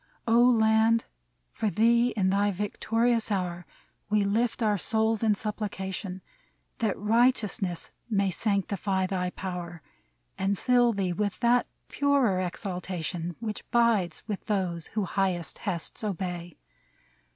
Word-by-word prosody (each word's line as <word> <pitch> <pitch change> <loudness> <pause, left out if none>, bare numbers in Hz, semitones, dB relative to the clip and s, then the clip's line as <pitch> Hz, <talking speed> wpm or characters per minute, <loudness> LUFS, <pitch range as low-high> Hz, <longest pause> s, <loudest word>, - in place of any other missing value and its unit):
O 230 +1 +5
Land! 225 -1 +4 0.5
for 215 - -1
thee 235 +3 +4
in 190 -2 +2
thy 200 +1 +2
victorious 225 +4 0
hour 180 -3 -2 0.4
We 210 -1 +3
lift 225 +4 0
our 210 -2 +2
souls 220 +2 +1
in 220 -2 +3
supplication, 190 -3 -4 0.6
That 220 -4 0
righteousness 210 -4 +1 0.2
may 200 -3 +1
sanctify 195 -1 0
thy 185 -1 -1
power 175 -3 -6 0.6
And 195 +1 +1
fill 245 +1 +4
thee 190 -3 -1
with 205 +2 -2
that 240 +1 +3 0.2
purer 275 -9 +2
exaltation 180 -2 -4
Which 220 -2 -5
bides 225 -8 +2
with 210 -3 -5
those 180 -5 -1
who 215 -2 -2
highest 180 -4 -1
bests 185 +1 -3
obey. 180 -4 -4
200 Hz, 120 wpm, -28 LUFS, 185-225 Hz, 0.6 s, O